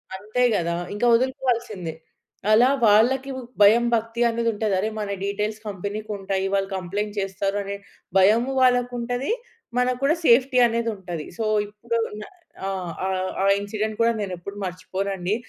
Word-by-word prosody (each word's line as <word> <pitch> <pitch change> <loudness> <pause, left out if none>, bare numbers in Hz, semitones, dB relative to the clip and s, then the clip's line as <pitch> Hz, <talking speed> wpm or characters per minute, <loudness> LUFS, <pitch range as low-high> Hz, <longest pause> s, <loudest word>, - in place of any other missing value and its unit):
అంతే 215 +6 -1
కదా! 170 -2 0 0.2
ఇంకా 210 +4 +1
వదులుకోవాల్సిందే. 235 - -1 0.6
అలా 230 +4 +6 0.2
వాళ్ళకి 250 +6 +4 0.3
భయం, 215 +4 +7
భక్తి 230 +1 -1
అనేది 230 0 0
ఉంటది. 215 -1 -1
అరె 215 +3 0
మన 210 -1 -3 0.2
డీటెయిల్స్ 210 +2 -2
కంపెనీ‌కి 205 +2 -5
ఉంటాయి, 195 -1 -2
వాళ్ళు 195 -1 +1
కంప్లెయింట్ 200 +3 -3
చేస్తారు. 195 +1 -2
అనే 200 0 -4 0.4
భయము 220 +7 +4
వాళ్ళకి 245 -1 +3
ఉంటది. 245 +3 -2 0.5
మనకు 250 0 +1
కూడా 295 +4 +4
సేఫ్టీ 255 +1 +5
అనేది 230 0 -1
ఉంటది. 175 -5 -6
సో - - 0 0.2
ఇప్పుడు 230 +3 -4 0.2
న - - -6 0.4
ఆహ్, 185 -3 -3 0.5
ఆహ్, 195 +1 +4
ఇన్సిడెంట్ 215 +1 -3
కూడా 230 0 +4
నేను 195 -3 -3
ఎప్పుడు 200 +4 -8
మర్చిపోనండి. 190 +1 -2
210 Hz, 145 wpm, -24 LUFS, 195-235 Hz, 0.6 s, భయం